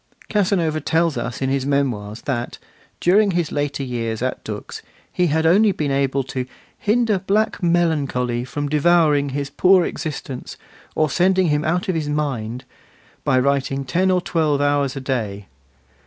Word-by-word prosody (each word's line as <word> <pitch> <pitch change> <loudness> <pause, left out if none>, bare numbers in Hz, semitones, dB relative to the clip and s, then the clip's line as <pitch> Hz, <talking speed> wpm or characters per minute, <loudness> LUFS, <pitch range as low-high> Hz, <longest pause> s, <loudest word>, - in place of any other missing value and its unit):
Casanova 180 -7 +1
tells 160 +2 +1
us 120 +1 -4
in 135 - 0
his 135 -1 0
Memoirs 125 -7 -1
that, 120 -4 -3 0.4
during 200 +4 +4
his 175 -4 -1
later 145 -1 -2
years 115 -3 -3
at - - -3
Dux, - - -7 0.3
he 180 - +2
had 160 +1 +1
only 200 +6 +5
been 150 -6 -2
able 135 0 +1
to 130 0 -4 0.3
'hinder 215 -2 +2
black 210 +4 0
melancholy 145 -9 +1
from 145 +3 -4
devouring 150 -1 +3
his 140 +1 -4
poor 185 +3 +4
existence, 135 -4 -6 0.4
or 155 - +2
sending 185 +3 +2
him 150 0 +1
out 175 +6 0
of 185 - +1
his 155 -3 -2
mind,' 130 -6 -3 0.6
by 130 - +2
writing 135 +1 0
ten 180 +9 +1
or 185 -1 +2
twelve 155 -5 0
hours 145 -1 +1
a 135 - -5
day. 110 -7 -3
145 Hz, 155 wpm, -21 LUFS, 135-175 Hz, 0.6 s, only